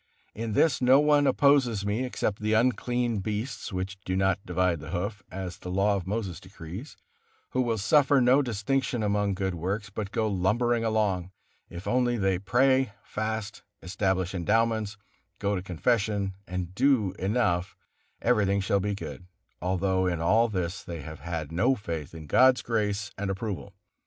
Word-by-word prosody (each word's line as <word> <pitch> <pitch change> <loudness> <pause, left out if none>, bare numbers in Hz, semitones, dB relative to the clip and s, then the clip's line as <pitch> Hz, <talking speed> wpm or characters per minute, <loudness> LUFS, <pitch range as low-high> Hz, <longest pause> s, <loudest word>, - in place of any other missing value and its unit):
In 115 0 -4
this 135 +5 +3
no 130 +2 +6
one 145 -1 +4
opposes 130 -9 +3
me 105 +5 0
except 110 -4 -2
the 110 +1 0
unclean 120 0 +1
beasts, 105 +6 -4
which 95 +1 -4
do 95 - -2
not 95 0 +1
divide 90 -1 0
the 75 +1 -9
hoof, 100 +5 -3
as 95 -1 -6
the 90 - -7
Law 100 +3 +2
of 95 -2 -4
Moses 95 -5 -3
decrees; 90 - -9 0.5
who 130 - +1
will 115 -2 0
suffer 140 +7 +4
no 130 +3 +5
distinction 120 0 -1
among 100 -1 +1
good 95 -1 -1
works, 95 +5 -3
but 100 0 -4
go 110 +1 0
lumbering 115 +5 +1
along: 105 -5 0 0.4
if 85 +2 -8
only 120 -1 +2
they 95 -3 +1
pray, 130 +4 +2
fast, 110 0 -4 0.2
establish 95 0 -1
endowments, 110 +3 +1 0.4
go 100 0 0
to 90 - -2
confession, 100 +2 0
and 90 0 -4
do 125 -4 +3
enough, 95 -3 0 0.5
everything 100 -4 +3
shall 100 +1 +1
be 100 +1 -1
good, 90 -2 -8 0.3
although 95 +1 +1
in 85 -2 -1
all 110 +8 +3
this 90 -4 -3
they 85 -2 -7
have 80 +2 -9
had 85 -3 -4
no 115 +11 +2
faith 85 - -6
in 80 -1 -8
God's 130 - +5
grace 105 -2 -1
and 100 -1 -2
approval. 100 -1 -4
100 Hz, 160 wpm, -27 LUFS, 95-115 Hz, 0.5 s, no